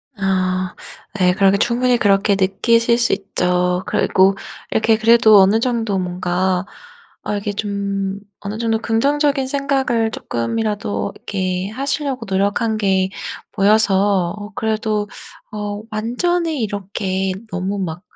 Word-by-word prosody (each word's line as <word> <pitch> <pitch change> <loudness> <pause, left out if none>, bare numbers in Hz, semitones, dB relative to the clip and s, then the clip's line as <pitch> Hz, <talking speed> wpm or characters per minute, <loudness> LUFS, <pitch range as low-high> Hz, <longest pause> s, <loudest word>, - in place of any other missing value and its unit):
아 185 -2 -1 0.4
네. 180 -1 +4
그렇게 195 0 +3
충분히 245 +3 +2
그렇게 200 -2 +3
느끼실 230 +5 +2
수 240 - +2
있죠. 180 -2 0
그리고 190 +1 +3 0.4
이렇게 220 0 +3
그래도 220 -1 +6
어느 195 +3 +5
정도 230 -4 0
뭔가 180 +1 -1 0.6
아 210 - -2
이게 205 0 -3
좀 200 -1 -3 0.2
어느 205 +1 -5
정도 225 -1 0
긍정적인 275 +5 +1
생각을 265 -5 0
조금이라도 210 - -2
이렇게 185 -1 -3
하시려고 270 +1 -3
노력한 205 +3 0
게 190 -2 +1 0.4
보여서 200 -3 +3
어 205 0 -9
그래도 215 -1 -1 0.4
어 205 -1 -4
완전히 300 +7 -1
이렇게 195 -2 -2 0.2
너무 190 +2 -2
막 175 -2 -4
205 Hz, 265 characters per minute, -19 LUFS, 190-230 Hz, 0.6 s, 그래도